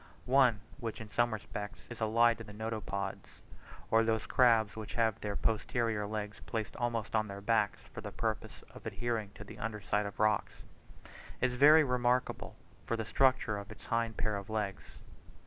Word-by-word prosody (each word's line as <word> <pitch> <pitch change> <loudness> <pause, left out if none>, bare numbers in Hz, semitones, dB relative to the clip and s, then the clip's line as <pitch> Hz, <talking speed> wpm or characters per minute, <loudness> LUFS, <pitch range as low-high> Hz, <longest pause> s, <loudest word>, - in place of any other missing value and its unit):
One, 125 -5 +4 0.2
which 115 -4 -4
in 110 -2 -9
some 120 0 +2
respects 105 -1 -6
is 120 -1 -9
allied 115 +1 +4
to - - -6
the 105 -1 -11
Notopods 105 -3 -4 0.5
(or 115 0 +5
those 110 -1 +1
crabs 115 -5 +4
which 110 -1 -7
have 115 -3 +1
their 105 -1 -3
posterior 110 -1 0
legs 105 0 -4
placed 110 -2 -3
almost 115 -3 -1
on 110 0 +2
their 100 -1 -6
backs, 105 0 +1
for - - -6
the - - -6
purpose - - -3
of - - -9
adhering 115 -4 -2
to - - -8
the 100 - -11
under 110 -1 -3
side 105 0 0
of 100 - -9
rocks), 110 -1 +1 0.8
is 125 -1 +1
very 150 +5 +8
remarkable 125 -1 0 0.3
from 115 - 0
the 110 - -3
structure 130 -4 +2
of 100 0 -9
its 105 -2 -11
hind 115 -1 -1
pair 105 -1 0
of 100 +1 -7
legs. 105 -3 -3
110 Hz, 180 wpm, -33 LUFS, 105-120 Hz, 0.8 s, very